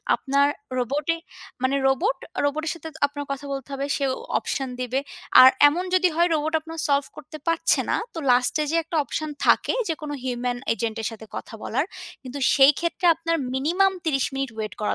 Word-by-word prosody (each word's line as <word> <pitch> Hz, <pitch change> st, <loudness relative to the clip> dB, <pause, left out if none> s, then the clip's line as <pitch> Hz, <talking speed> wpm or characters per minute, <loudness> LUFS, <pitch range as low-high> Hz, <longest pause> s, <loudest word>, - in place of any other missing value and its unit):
আপনার 280 Hz, +1 st, +2 dB, 0.3 s
রোবটের, 290 Hz, +7 st, -1 dB, 0.4 s
মানে 260 Hz, +1 st, +2 dB
রোবটের 310 Hz, -, 0 dB
সাথে 325 Hz, -1 st, -9 dB, 0.4 s
কথা 275 Hz, +1 st, -6 dB
বলতে 270 Hz, -2 st, -5 dB
হবে, 275 Hz, 0 st, -2 dB
সেও 275 Hz, -2 st, 0 dB, 0.3 s
অপশন 270 Hz, -1 st, -3 dB
দিবে। 255 Hz, +2 st, -1 dB, 0.4 s
আর 255 Hz, -, +11 dB, 0.2 s
এমন 345 Hz, +5 st, -2 dB
যদি 370 Hz, 0 st, +4 dB
হয়, 345 Hz, +1 st, +4 dB
রোবট 310 Hz, +1 st, -1 dB
আপনার 325 Hz, +1 st, -9 dB
সল্ভ 280 Hz, -1 st, +2 dB
করতে 305 Hz, +2 st, -10 dB
পারছে 330 Hz, 0 st, +2 dB
না, -, -, +2 dB, 0.2 s
তো -, -, -5 dB
লাস্টে 250 Hz, +5 st, +3 dB
যে 330 Hz, -, +1 dB
একটা 330 Hz, +1 st, -4 dB
অপশন 310 Hz, +2 st, -4 dB, 0.2 s
থাকে, -, -, +4 dB, 0.2 s
যেকোনো 305 Hz, -2 st, -4 dB
হিউম্যান 245 Hz, -1 st, -2 dB, 0.2 s
এজেন্টের 225 Hz, 0 st, -3 dB
সাথে 220 Hz, 0 st, -10 dB
কথা -, -, -7 dB
বলার, 265 Hz, +6 st, 0 dB, 0.4 s
কিন্তু 260 Hz, +1 st, -7 dB, 0.2 s
সেই 275 Hz, +1 st, +7 dB
ক্ষেত্রে 340 Hz, +1 st, -1 dB
আপনার 330 Hz, +1 st, -1 dB, 0.2 s
মিনিমাম 355 Hz, +9 st, +2 dB
৩০ 275 Hz, -5 st, +1 dB
মিনিট 270 Hz, -1 st, -2 dB
ওয়েট 215 Hz, -1 st, -4 dB
করা 210 Hz, -, 0 dB
280 Hz, 170 wpm, -24 LUFS, 260-325 Hz, 0.4 s, আর